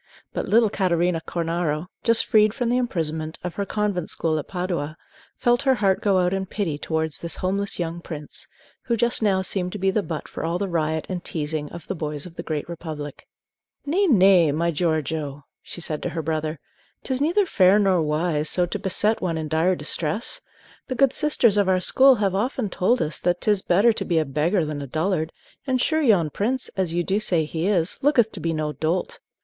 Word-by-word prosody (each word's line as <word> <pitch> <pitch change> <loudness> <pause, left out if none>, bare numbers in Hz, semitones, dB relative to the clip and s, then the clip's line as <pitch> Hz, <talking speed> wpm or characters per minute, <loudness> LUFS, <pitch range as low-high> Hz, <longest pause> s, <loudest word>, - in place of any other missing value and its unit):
But - - -3
little 225 -1 +4
Catarina 175 -3 +1
Cornaro, 165 -2 -1 0.2
just 230 -1 +3
freed 215 0 +4
from 245 -3 -1
the 245 - +2
imprisonment 160 -9 -2
of 180 -1 -4
her 200 -1 -3
convent 205 -5 -1
school 160 -1 0
at 145 - -7
Padua, 175 -4 -3 0.4
felt 240 +1 +2
her 265 -2 +3
heart 195 -5 +1
go 200 -2 +3
out 180 0 +2
in 190 0 -2
pity 175 -8 -3
towards 160 -1 -2
this 170 - -5
homeless 200 +2 -2
young 170 0 -3
prince, 150 -4 -7 0.4
who 235 -2 0
just 235 +1 +2
now 195 -3 +2
seemed 180 -1 -2
to - - -4
be 195 0 +1
the 210 - +1
butt 165 -5 -5
for - - -7
all 165 +2 0
the 200 +2 -2
riot 160 -3 -1
and 180 -2 -4
teasing 150 -1 -3
of 170 -3 -9
the - - -3
boys 150 -4 -4
of 175 -2 -11
the - - -5
Great 155 -2 -4
Republic. 155 -4 -7 0.6
"Nay, 370 +8 +2
nay, 190 - +5
my 170 +3 0
Giorgio," 155 -3 -2 0.2
she 175 - -8
said 155 -2 -4
to - - -2
her 165 -1 -4
brother; 155 -1 -2 0.4
"'t 265 - -2
is 260 - -2
neither 350 +7 +3
fair 190 - +4
nor 190 -4 +3
wise 155 0 0
so 180 - +3
to 175 - -4
beset 210 +4 +1
one 170 -3 -1
in 160 -1 -3
dire 160 +4 +2
distress. 155 +6 -2 0.5
The 255 - -3
good 275 +1 +3
sisters 240 -8 +3
of 200 -2 +3
our 185 -1 +3
school 265 +8 +5
have 200 -4 0
often 215 +1 -1
told 235 +7 +2
us 155 +1 -4
that 175 0 0
't 215 - +2
is 205 -2 +1
better 200 +7 +4
to - - -3
be 170 - 0
a 160 - +2
beggar 155 +6 +1
than 150 -1 -4
a 140 - -6
dullard; 160 +2 -1 0.4
and 260 -1 +1
sure 315 +5 +1
yon 195 - +3
prince, 250 - -1
as 190 -4 -2
you 175 +1 0
do 195 +4 0
say 170 -7 +1
he 160 +3 -2
is, 185 -3 +1
looketh 245 -6 +3
to 195 - -8
be 165 0 -1
no 155 -1 -1
dolt. 165 +4 -2
180 Hz, 215 wpm, -23 LUFS, 160-210 Hz, 0.6 s, nay